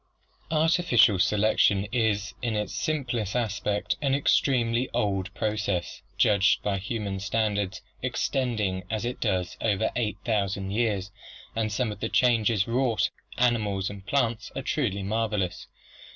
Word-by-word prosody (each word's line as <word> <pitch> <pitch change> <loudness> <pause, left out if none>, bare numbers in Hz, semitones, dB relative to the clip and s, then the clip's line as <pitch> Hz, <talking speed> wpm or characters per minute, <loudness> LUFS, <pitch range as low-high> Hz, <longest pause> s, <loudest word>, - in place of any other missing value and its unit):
Artificial 160 - +4
selection 105 0 +3
is, 110 -4 0
in 120 -3 -1
its 105 -2 -2
simplest 125 - -2
aspect, 105 -3 -1
an 135 -2 +2
extremely 125 -3 +2
old 100 -4 0
process, 105 -5 -2 0.2
judged 100 -2 +3
by 100 -2 0
human 100 -1 -3
standards, 100 -2 -1 0.2
extending 105 -8 -1
as 110 +1 -2
it 125 - -3
does 90 -5 -1
over 110 -1 +1
eight 110 -3 -1
thousand 100 -3 -1
years, 105 -3 0 0.4
and 110 -1 0
some 110 +1 0
of 105 - -8
the - - -2
changes 115 -4 +3
wrought 120 -1 +1 0.3
among 125 - +4
animals 100 -4 -2
and 100 -1 -10
plants 120 -5 0
are - - -3
truly 100 -10 -1
marvelous. 105 -3 -1
110 Hz, 135 wpm, -27 LUFS, 100-120 Hz, 0.4 s, Artificial